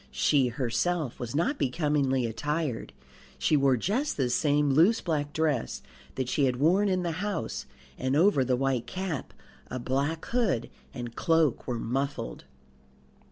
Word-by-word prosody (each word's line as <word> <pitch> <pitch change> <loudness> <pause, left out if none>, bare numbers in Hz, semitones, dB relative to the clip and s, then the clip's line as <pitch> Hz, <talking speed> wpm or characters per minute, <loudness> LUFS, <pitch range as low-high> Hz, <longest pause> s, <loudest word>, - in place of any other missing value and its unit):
She 135 -4 +2
herself 130 +5 -1
was 120 +1 -5
not 265 - +1
becomingly 140 -3 +1
attired; 145 +3 -2 0.5
she 155 - +2
wore 135 -3 +4
just 240 - -1
the 130 -3 +1
same 145 +1 +2
loose 170 +11 +5
black 150 -4 -2
dress 145 - -1 0.3
that 130 -2 -2
she 140 +2 +2
had 125 -1 +1
worn 180 +10 +3
in 185 -1 +1
the 170 - -1
house, 200 - -3 0.3
and 130 +1 0
over 165 -3 +4
the 130 0 +1
white 135 -2 0
cap 185 -6 -4 0.4
a 130 - -5
black 140 +6 -1
hood 220 - 0 0.2
and 120 -2 -7
cloak 165 -5 +2
were 125 -2 -1
muffled. 125 - -3
140 Hz, 150 wpm, -28 LUFS, 125-165 Hz, 0.5 s, loose